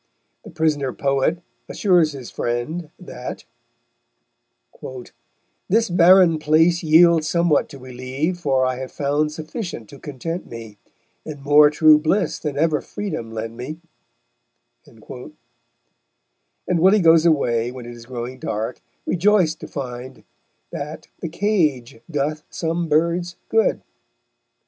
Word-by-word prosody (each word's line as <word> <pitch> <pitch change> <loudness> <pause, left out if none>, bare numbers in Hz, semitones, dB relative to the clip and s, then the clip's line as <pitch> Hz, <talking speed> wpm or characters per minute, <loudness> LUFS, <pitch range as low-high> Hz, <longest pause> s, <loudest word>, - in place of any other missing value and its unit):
The - - -11
prisoner 145 -5 0
poet 140 +5 0 0.3
assures 175 -6 +2
his 130 -4 -9
friend 150 +8 -3
that 130 -8 -8 2.3
_This 225 -3 +2
barren 175 -2 +6
place 160 +3 +3
yields 160 0 +5
somewhat 170 -3 +2
to 140 - -10
relieve, 130 +7 -4
For 135 -5 +1
I 130 -1 -1
have 130 0 -6
found 145 +2 0
sufficient 155 - -6
to 140 - -12
content 160 +6 -6
me, 115 -3 -10 0.4
And 145 -3 -9
more 150 +1 +6
true 150 0 +5
bliss 170 +3 0
than 145 -3 -4
ever 155 -1 +1
freedom 185 - -5
lent 115 0 -5
me_; 130 +6 -6 1.1
and - - -19 1.8
Willy 190 +5 +5
goes 165 -2 +5
away, 120 -7 +1
when 125 -1 -9
it 120 - -8
is 120 -1 -12
growing 125 0 -6
dark, 110 +1 -4 0.2
rejoiced 180 -3 +2
to - - -8
find 130 -3 -7 0.5
that 150 +2 -7
"the 170 - -4
cage 155 - 0
doth 150 0 -2
some 165 0 -2
birds 170 +3 +1
good." 225 0 +1
150 Hz, 120 wpm, -21 LUFS, 130-170 Hz, 2.3 s, barren